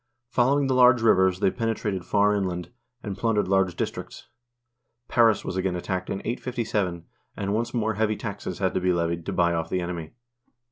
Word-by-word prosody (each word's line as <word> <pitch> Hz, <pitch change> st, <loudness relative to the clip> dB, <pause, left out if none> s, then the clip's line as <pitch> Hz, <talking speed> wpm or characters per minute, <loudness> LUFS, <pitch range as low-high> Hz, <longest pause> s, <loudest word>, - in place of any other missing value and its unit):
Following 135 Hz, +3 st, +3 dB
the 135 Hz, -, +1 dB
large 125 Hz, -2 st, +5 dB
rivers, 95 Hz, -4 st, +4 dB
they 95 Hz, -, +3 dB
penetrated 110 Hz, -5 st, -2 dB
far 105 Hz, +2 st, +3 dB
inland, 90 Hz, -3 st, -2 dB, 0.3 s
and 100 Hz, -3 st, -4 dB
plundered 105 Hz, -1 st, 0 dB
large 95 Hz, -2 st, +2 dB
districts. -, -, -5 dB, 0.8 s
Paris 115 Hz, -3 st, +3 dB
was 95 Hz, -, -3 dB
again 95 Hz, -1 st, 0 dB
attacked 90 Hz, +1 st, -3 dB
in 95 Hz, -, -3 dB
857, 110 Hz, -8 st, -2 dB, 0.3 s
and 100 Hz, 0 st, -2 dB
once 115 Hz, +2 st, -1 dB
more 110 Hz, -2 st, 0 dB
heavy 110 Hz, +1 st, 0 dB
taxes 100 Hz, -4 st, -5 dB
had 95 Hz, -2 st, 0 dB
to -, -, 0 dB
be 90 Hz, 0 st, +2 dB
levied 85 Hz, -1 st, -2 dB
to -, -, -1 dB
buy 85 Hz, 0 st, +2 dB
off 80 Hz, -1 st, -2 dB
the 95 Hz, -, 0 dB
enemy. 85 Hz, -1 st, -5 dB
100 Hz, 180 wpm, -25 LUFS, 90-115 Hz, 0.8 s, large